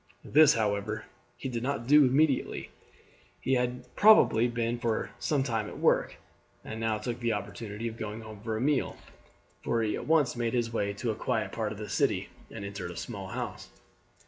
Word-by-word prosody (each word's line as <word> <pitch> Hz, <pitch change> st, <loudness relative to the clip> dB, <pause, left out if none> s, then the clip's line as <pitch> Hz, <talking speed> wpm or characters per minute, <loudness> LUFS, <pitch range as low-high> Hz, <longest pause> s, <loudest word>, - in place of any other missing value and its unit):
This, 150 Hz, 0 st, +6 dB
however, 105 Hz, -1 st, -1 dB, 0.3 s
he -, -, -5 dB
did 120 Hz, -3 st, -3 dB
not 130 Hz, -2 st, -2 dB
do 150 Hz, +3 st, +7 dB
immediately. 135 Hz, +1 st, +1 dB, 0.7 s
He 135 Hz, -, 0 dB
had 125 Hz, 0 st, 0 dB
probably 205 Hz, -, +6 dB
been 120 Hz, 0 st, -1 dB
for 115 Hz, -2 st, -1 dB
some 135 Hz, +3 st, +1 dB
time 115 Hz, -5 st, -1 dB
at -, -, -8 dB
work, -, -, +2 dB, 0.5 s
and 110 Hz, -, -6 dB
now 110 Hz, -1 st, 0 dB
took 120 Hz, +2 st, -4 dB
the 120 Hz, -1 st, 0 dB
opportunity 105 Hz, +2 st, -5 dB
of 115 Hz, 0 st, -6 dB
going 110 Hz, 0 st, -5 dB
home 110 Hz, -2 st, -10 dB
for 110 Hz, 0 st, -2 dB
a -, -, -3 dB
meal, 140 Hz, 0 st, +1 dB, 0.7 s
for 115 Hz, -1 st, +1 dB
he 105 Hz, -, 0 dB
at -, -, -6 dB
once 150 Hz, -6 st, +3 dB
made 120 Hz, -1 st, -1 dB
his 115 Hz, -1 st, 0 dB
way 100 Hz, -3 st, 0 dB
to 110 Hz, +3 st, -2 dB
a -, -, -4 dB
quiet 110 Hz, -2 st, -1 dB
part 110 Hz, -2 st, -2 dB
of 105 Hz, -, -6 dB
the 105 Hz, 0 st, -6 dB
city, -, -, 0 dB, 0.2 s
and 100 Hz, -, -7 dB
entered 100 Hz, -3 st, -5 dB
a 85 Hz, -, -8 dB
small 100 Hz, -3 st, -6 dB
house. 95 Hz, -, -5 dB
115 Hz, 195 wpm, -29 LUFS, 105-125 Hz, 0.7 s, do